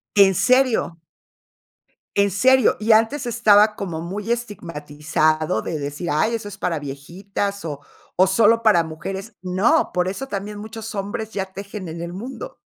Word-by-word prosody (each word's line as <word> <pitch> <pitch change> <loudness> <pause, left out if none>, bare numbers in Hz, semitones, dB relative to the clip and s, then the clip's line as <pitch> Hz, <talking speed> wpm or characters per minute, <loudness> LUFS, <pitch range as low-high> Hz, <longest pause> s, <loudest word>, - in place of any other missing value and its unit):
¿En 195 -2 +6
serio? 250 -8 +2 1.2
En 200 -1 +3
serio, 260 +3 +4
y 220 - -2
antes 225 +6 +4
estaba 215 -3 +4
como 175 -5 -4
muy 200 +7 -3
estigmatizado 155 - -1
de 155 - -3
decir: 145 +4 -5
"Ay, 155 +10 +1
eso 210 -2 -4
es 200 0 -10
para 170 -5 -1
viejitas 190 +8 -5
o 145 -3 -5 0.4
o 185 - +5
solo 225 +4 +4
para 205 -7 +5
mujeres". 195 +7 -7
No, 195 - +2
por 180 0 +1
eso 225 +8 -4
también 205 -3 -5
muchos 220 +1 -7
hombres 205 +2 -4
ya 195 -2 -3
tejen 200 -1 -7
en 165 +1 -6
el 170 0 -5
mundo. 240 +8 -7
200 Hz, 155 wpm, -22 LUFS, 170-220 Hz, 1.2 s, En